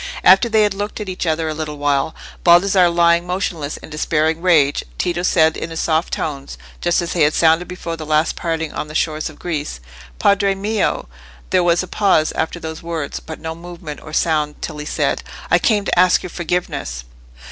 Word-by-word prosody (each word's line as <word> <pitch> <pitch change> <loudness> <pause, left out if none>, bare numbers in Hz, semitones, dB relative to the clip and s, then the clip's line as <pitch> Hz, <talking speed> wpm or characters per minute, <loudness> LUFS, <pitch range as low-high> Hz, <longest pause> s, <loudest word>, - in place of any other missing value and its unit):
After 190 +6 +6
they 220 -1 +4
had 205 -2 +1
looked 205 +2 -4
at 210 -2 -5
each 180 -1 -3
other 160 0 0
a 155 - -2
little 150 -1 -5
while, 145 +1 0 0.3
Baldassarre 180 +1 +5
lying 170 0 +3
motionless 175 -5 -3
in - - -12
despairing 155 +1 0
rage, 155 -6 +3
Tito 175 0 -1
said 160 -3 +3
in 165 - -5
his 165 0 -5
soft 160 +1 0
tones, 140 -3 -4 0.2
just 175 0 +2
as 170 - -4
they 175 - 0
had 150 +1 +4
sounded 165 +2 +3
before 175 -2 -5
the 160 - -7
last 155 +1 +2
parting 160 -2 -3
on - - -4
the 155 - -10
shores 155 -1 -1
of 155 - -14
Greece— 150 - -4 0.4
"Padre 200 - +3
mio!" 210 +3 -1 0.4
There 185 -1 +3
was 175 +1 +3
a - - -7
pause 190 -7 +2
after 160 +2 -2
those 160 -1 -6
words, 165 -4 -4
but 160 - -9
no 160 0 -5
movement 170 -3 -9
or 155 - -10
sound 150 -2 0
till 155 -2 -6
he 150 - -6
said— - - 0 0.3
"I - - +5
came 210 -3 +2
to 175 - +1
ask 180 0 +4
your 180 - -6
forgiveness!" 170 - -3
165 Hz, 200 wpm, -19 LUFS, 155-180 Hz, 0.4 s, After